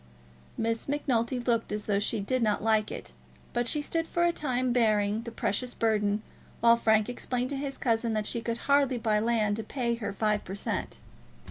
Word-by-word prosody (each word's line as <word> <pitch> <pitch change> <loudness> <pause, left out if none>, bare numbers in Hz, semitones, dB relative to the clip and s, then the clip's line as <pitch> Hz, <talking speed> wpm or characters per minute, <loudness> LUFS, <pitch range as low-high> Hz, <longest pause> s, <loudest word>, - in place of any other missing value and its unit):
Miss 230 0 -1
Macnulty 260 -4 0
looked 235 -2 0
as 210 0 -3
though 200 -1 +1
she 215 +2 -1
did 250 +6 0
not 210 -2 +1
like 220 -1 +2
it, - - -6 0.4
but 240 0 0
she 295 +4 +1
stood 330 +2 -1
for 345 - 0
a 345 - +4
time 255 -5 0
bearing 215 -3 +2
the 235 0 -7
precious 240 +3 -2
burthen, 210 -2 +1 0.4
while 235 0 +6
Frank 220 -2 +3
explained 250 +1 -2
to - - -2
his 275 0 -4
cousin 230 -2 +1
that 215 -1 -1
she 235 - -2
could 230 0 -2
hardly 280 -2 +3
buy 215 -2 +1
land 215 -2 +1
to 225 - -3
pay 235 +1 -1
her 230 -3 -3
five 210 +1 0
per 190 - -6
cent. 200 - -3
230 Hz, 200 wpm, -29 LUFS, 215-250 Hz, 0.4 s, while